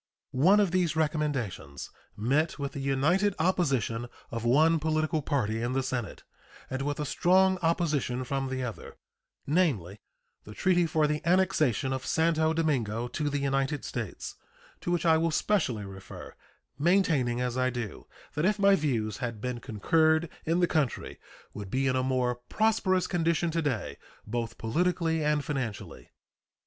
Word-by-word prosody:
One 180 +11 +5
of 200 -4 +2
these 180 -3 +1
recommendations 145 - -2 0.3
met 140 +9 +1
with 140 -1 -3
the - - -6
united 155 +9 +1
opposition 135 - 0 0.2
of 115 -1 -4
one 155 +7 +4
political 155 0 0
party 115 -7 -1
in 120 +2 -1
the 135 0 0
Senate 125 -4 -4 0.5
and 130 +1 -2
with 145 +1 -2
a 150 - -1
strong 185 +4 +3
opposition 155 -7 0
from 135 +1 -2
the 130 -1 -3
other, 115 -3 -7 0.5
namely, 135 - 0 0.4
the 105 - -11
treaty 175 -2 +2
for 155 -1 +2
the 150 0 -1
annexation 170 - +2
of 130 - -3
Santo 160 -1 +2
Domingo 125 -8 0
to 145 +4 -2
the 145 - -1
United 135 +1 -1
States, 115 -6 -5 0.4
to - - -5
which 175 -1 0
I 160 -1 +5
will 165 +1 +1
specially 140 - 0
refer, 95 -1 -10 0.5
maintaining, 150 -8 +2
as 125 -1 -1
I 130 0 +1
do, 120 -5 -6 0.3
that 150 - -1
if 210 +3 +2
my 200 -1 +5
views 115 - -1
had 115 -3 -4
been 125 +1 -3
concurred 160 +9 +2 0.2
in 170 +2 +2
the 175 - +4
country 150 -7 -1 0.3
would 100 -2 -7
be 130 +6 0
in 130 -1 +2
a 130 - +2
more 130 -1 0
prosperous 205 -4 +2
condition 170 -1 0
to 165 +1 0
day, 115 - -2 0.3
both 115 +1 -4
politically 165 +5 0
and 150 -1 +1
financially. 130 -9 -5
145 Hz, 160 wpm, -28 LUFS, 125-165 Hz, 0.5 s, One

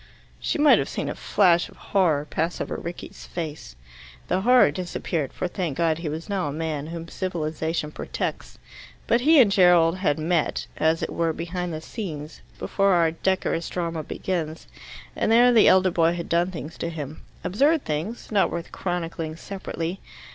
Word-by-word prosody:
She - - -1
might 295 0 +6
have - - -2
seen - - -3
a - - -2
flash 175 -4 +2
of - - -18
horror 165 -7 +1
pass 160 +3 -2
over - - -3
Rickie's 170 +1 -8
face. 155 - -6 0.5
The 185 +1 +1
horror 250 -6 +6
disappeared, 165 -3 -3
for, - - -3
thank 175 -6 -3
God, 165 -1 +1
he 165 -2 -3
was 160 +2 -5
now 195 -6 -1
a - - -2
man, 155 -1 -3
whom 165 0 -6
civilization 160 -3 -3
protects. - - -5 0.5
But 235 - +2
he 310 +3 +6
and 225 -6 +6
Gerald 180 -3 +5
had 185 -6 +1
met, 160 0 0
as 160 +1 +2
it - - -3
were, 165 -1 0
behind 175 +2 -4
the 155 -1 -5
scenes, 160 -7 -7 0.2
before 195 -1 +1
our 165 -2 +3
decorous 170 0 -1
drama 170 -2 -3
opens, 160 0 -4 0.5
and - - 0
there 245 +2 +6
the 225 - +6
elder 185 0 +5
boy 165 -1 +3
had 170 -1 -5
done 170 +2 +2
things 165 -2 -8
to 170 - -2
him 155 -2 -7 0.2
absurd 285 - +2
things, 165 +13 -4
not 205 -2 +3
worth 170 0 -5
chronicling 165 -3 -3
separately. 180 -1 -5
170 Hz, 175 wpm, -24 LUFS, 160-190 Hz, 0.5 s, might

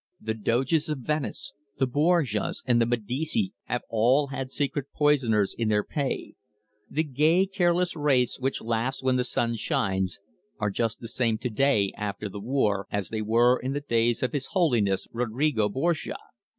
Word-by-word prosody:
The 110 0 -2
Doges 130 +8 +1
of 150 -4 -2
Venice, 150 -1 -2 0.2
the 135 - +2
Borgias, 145 - +1
and 120 -2 +3
the 115 - +3
Medici 135 - -1
have 120 - -2
all 125 +6 +3
had 135 -1 -5
secret 140 +1 -1
poisoners 125 -9 +2
in 115 - -1
their 105 -1 +2
pay. 140 -3 -3 0.6
The 155 +3 0
gay, 155 +6 +3
careless 180 -2 +1
race 135 -6 +2
which 135 +1 -1
laughs 115 +4 -1
when 130 -1 +2
the 125 - +2
sun 115 -2 0
shines, 95 -3 0 0.4
are 105 - -1
just 115 +3 -1
the 115 - -6
same 115 -2 0
to 125 +1 -4
day, 110 -5 +2
after 105 0 -4
the 100 +1 -7
war, 105 -5 0
as 100 -4 -2
they 110 -1 -3
were 120 +4 +3
in 130 +2 -3
the 145 - -1
days 120 -3 +1
of 130 - -1
His 140 -2 -2
Holiness 120 - +1
Rodrigo 120 -1 0
Borgia. 160 +9 -1
125 Hz, 170 wpm, -26 LUFS, 110-145 Hz, 0.6 s, and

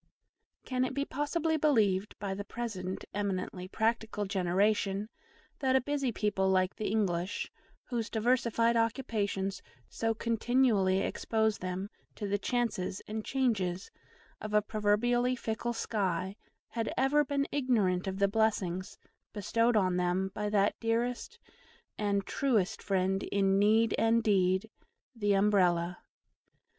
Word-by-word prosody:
Can 255 -1 0
it 255 0 -2
be 280 0 0
possibly 315 +3 -1
believed, 215 -10 +2
by 195 -1 -3
the 200 +1 -5
present 200 -5 -5
eminently 185 -2 -3
practical 220 0 -1
generation, 195 +2 +1 0.5
that 265 -2 +2
a 265 - +4
busy 275 -2 -1
people 205 -3 0
like 185 0 +2
the 215 - -3
English, 190 -3 -1 0.3
whose 230 -3 -3
diversified 235 0 +2
occupations 210 -5 -1 0.3
so 225 0 -1
continually 225 -4 +2
expose 220 -1 0
them 185 +2 -3 0.3
to 205 - -4
the 200 +1 0
chances 215 -5 -1
and 215 +1 -4
changes 200 -10 -1 0.5
of 215 0 -3
a 210 - +6
proverbially 240 +4 +1
fickle 235 0 -3
sky, 190 -4 -2 0.3
had 230 -2 -2
ever 270 +3 +3
been 280 0 -1
ignorant 210 -10 +1
of 190 0 -3
the 200 0 +3
blessings 200 -3 0 0.4
bestowed 230 +3 +1
on 185 -3 +2
them 180 +2 0
by 210 0 -2
that 205 -1 +2
dearest 240 - -1 0.6
and 200 -2 0
truest 230 -8 0
friend 190 0 0
in 195 -1 +1
need 220 +2 +4
and 225 0 +3
in 230 - +3
deed, 190 -1 +2 0.5
the 205 -3 +1
UMBRELLA? 180 -4 +2
210 Hz, 130 wpm, -31 LUFS, 190-235 Hz, 0.6 s, a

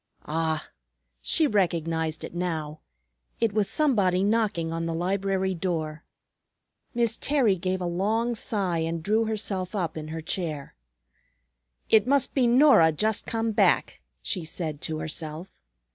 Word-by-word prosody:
Ah! 160 0 -1 0.5
She 320 - +2
recognized 165 - 0
it - - -7
now. 160 -4 -3 0.6
It 225 -3 +1
was 210 -2 +1
somebody 200 - +2
knocking 200 -6 0
on 165 0 -2
the 165 - -2
library 190 +2 0
door. 165 -3 -3 0.9
Miss 235 -2 +2
Terry 265 -9 +2
gave 185 +1 -2
a - - -2
long 215 +7 0
sigh 195 -6 -1
and 165 0 -2
drew 220 +4 +2
herself 200 -3 -2
up 170 -5 -2
in 155 -1 -6
her 160 +1 -5
chair. 155 -4 -4 1.2
"It 220 +1 +5
must 280 -1 +2
be 255 -3 +3
Norah 240 - +6
just 215 +7 0
come 225 0 -1
back," 210 - +2 0.2
she 185 -6 -3
said 155 -2 -5
to 155 - -3
herself. 155 - -5
185 Hz, 140 wpm, -26 LUFS, 160-220 Hz, 1.2 s, Norah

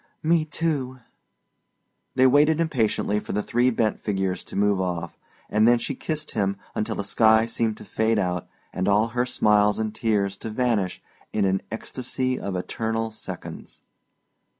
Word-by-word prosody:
"Me, 165 0 +3
too." 150 -4 -2 1.2
They 130 - +5
waited 150 +4 +5
impatiently 115 -9 +1
for - - -6
the 105 +1 0
three 120 +2 +2
bent 115 -3 0
figures 95 -3 -2
to - - -9
move 100 -1 +2
off, 85 -2 -3 0.3
and 110 +1 +3
then 120 0 +6
she 130 - -3
kissed 155 +3 -4
him 100 -2 0 0.2
until 110 +1 -2
the - - -3
sky 110 +2 +4
seemed 115 -2 -1
to - - -11
fade 110 0 +1
out 90 -3 -1 0.3
and 95 +1 -1
all 105 +3 +3
her 125 +2 0
smiles 105 -3 +3
and 110 -1 -2
tears 100 -3 0
to 115 - -5
vanish 110 -5 0 0.3
in 105 -2 +2
an 95 0 +1
ecstasy 130 +3 -3
of 100 - -4
eternal 110 +4 -2
seconds. 110 - -9
110 Hz, 160 wpm, -25 LUFS, 100-125 Hz, 1.2 s, then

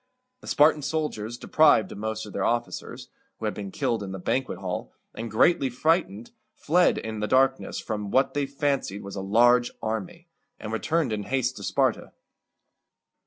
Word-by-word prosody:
The - - -14
Spartan 150 +1 +4
soldiers, 135 -7 -3
deprived 145 -8 +4
of - - -8
most 110 0 -3
of 105 - -10
their 100 - -2
officers 120 0 -3 0.3
(who 110 - -5
had 105 - -1
been 100 -2 -6
killed 115 +3 -1
in 95 -1 -6
the - - -4
banquet 130 +8 -2
hall), - - -5 0.2
and 115 +1 -6
greatly 135 +5 +3
frightened, 125 - 0 0.2
fled 175 +3 +3
in 110 -1 -5
the 105 - -1
darkness 135 +2 +2
from 105 -2 -4
what 130 +6 +2
they 145 -1 -1
fancied 140 -7 -2
was 100 0 -8
a 95 - -4
large 120 +5 +4
army, 170 +11 -4 0.3
and 110 0 -6
returned 155 +1 0
in 105 - -2
haste 130 -1 -1
to 100 - -8
Sparta. - - 0
120 Hz, 170 wpm, -26 LUFS, 105-140 Hz, 0.3 s, Spartan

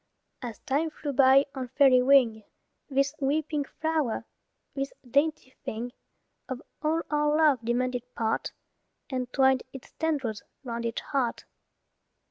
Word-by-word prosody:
As 235 -3 -6
time 295 +5 0
flew 295 -2 -5
by 270 +1 +6
on 260 -2 -4
fairy 265 -3 +7
wing, 250 -5 +4 0.5
This 275 +1 +1
wee 290 +3 +1
pink 295 -2 -3
flower, 315 -7 -1 0.5
this 275 0 -3 0.2
dainty 280 +1 +1
thing, 235 +3 -4 0.6
Of 260 -2 -3 0.2
all 320 +2 +1
our 295 0 +2
love 300 -5 +5
demanded 245 +1 -1
part, 220 -1 -1 0.6
And 250 -1 -2
twined 265 -2 +4
its 270 - -10
tendrils 275 -10 -1 0.2
'round 235 -2 -4
each 230 - -3
heart. 260 -5 -1
270 Hz, 130 wpm, -28 LUFS, 245-295 Hz, 0.6 s, fairy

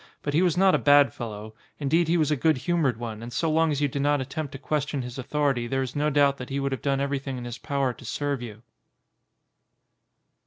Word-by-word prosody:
But 145 - -2
he 160 - +3
was 180 -2 +2
not 190 0 +5
a - - +3
bad 145 -1 +5
fel 120 -2 -5
low; 105 +1 -9 0.2
indeed 155 +4 +1
he 170 +2 +2
was 155 -2 +1
a - - +3
good 155 +1 +2
humoured 150 -5 0
one 115 -2 -6
and 120 +1 -7
so 160 +5 0
long 160 +1 +3
as 145 -1 -1
you 145 - +3
did 140 +1 -3
not 145 0 +2
attempt 140 +2 -4
to - - -5
question 145 -1 -2
his 125 +1 -7
au - - -1
thority 135 -3 0
there 135 0 0
is 130 -1 -6
no 150 +1 +1
doubt 140 -1 +3
that 125 - -8
he 140 +1 -2
would 140 0 -1
have 130 -4 -3
done 140 -1 0
everything 140 -1 -2
in 120 - -6
his 120 -1 -6
power 140 -3 -1
to - - -15
serve 140 +2 -2
you. 115 -2 -9
140 Hz, 250 wpm, -26 LUFS, 125-150 Hz, 0.2 s, not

